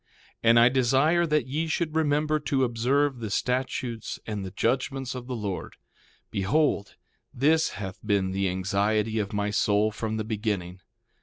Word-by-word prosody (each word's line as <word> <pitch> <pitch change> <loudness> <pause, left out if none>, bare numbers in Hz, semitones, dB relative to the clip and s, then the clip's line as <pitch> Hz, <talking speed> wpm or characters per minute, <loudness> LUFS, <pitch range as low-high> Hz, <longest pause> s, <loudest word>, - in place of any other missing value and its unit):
1:16 - - -45 0.4
And 115 +1 +7
I 120 +1 +7
desire 135 +7 +3
that 150 -1 +1
ye 150 +5 -2
should 160 -1 -1
remember 155 0 +2
to 140 -2 0
observe 130 +3 +1
the 110 -2 -4
statutes 125 0 -2
and 105 -3 -4
the 95 - -5
judgments 130 +5 -1
of 125 -1 -7
the 130 - -3
Lord; 100 -5 -4 0.6
behold, 100 +2 +1 0.4
this 155 +5 +2
hath 95 -2 -6
been 100 -3 +1
the 95 0 0
anxiety 100 +4 0
of 100 -1 -2
my 105 0 -1
soul 105 +1 +2
from 110 +1 -3
the 110 - -2
beginning. 105 -5 -3
115 Hz, 160 wpm, -26 LUFS, 105-135 Hz, 0.6 s, And